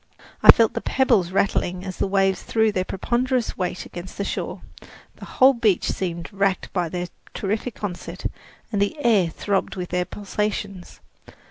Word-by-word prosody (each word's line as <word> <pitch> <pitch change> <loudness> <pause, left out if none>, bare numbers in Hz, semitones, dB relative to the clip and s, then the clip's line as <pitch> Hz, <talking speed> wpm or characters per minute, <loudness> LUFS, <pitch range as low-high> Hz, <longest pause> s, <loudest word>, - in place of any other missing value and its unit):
I - - +3
felt 225 -1 +3
the - - -3
pebbles 235 -9 +2
rattling 185 -1 0
as 185 -2 -6
the - - 0
waves 195 -1 +2
threw 220 -1 +2
their 185 -2 -1
ponderous 245 +5 -1
weight 180 0 -3
against 175 +1 -9
the 200 - -1
shore; - - -4 0.5
the - - -9
whole 265 +1 +5
beach 220 -6 +1
seemed 170 0 -4
racked 195 -1 0
by 175 -3 0
their 180 +1 -3 0.3
terrific 215 +3 -3
onset, 180 -4 -5 0.5
and 205 -3 0
the 200 +9 0
air 205 -7 +4
throbbed 195 +3 -1
with 180 -2 -5
their 180 0 0
pulsations. 205 -2 -4
195 Hz, 160 wpm, -23 LUFS, 185-215 Hz, 0.5 s, whole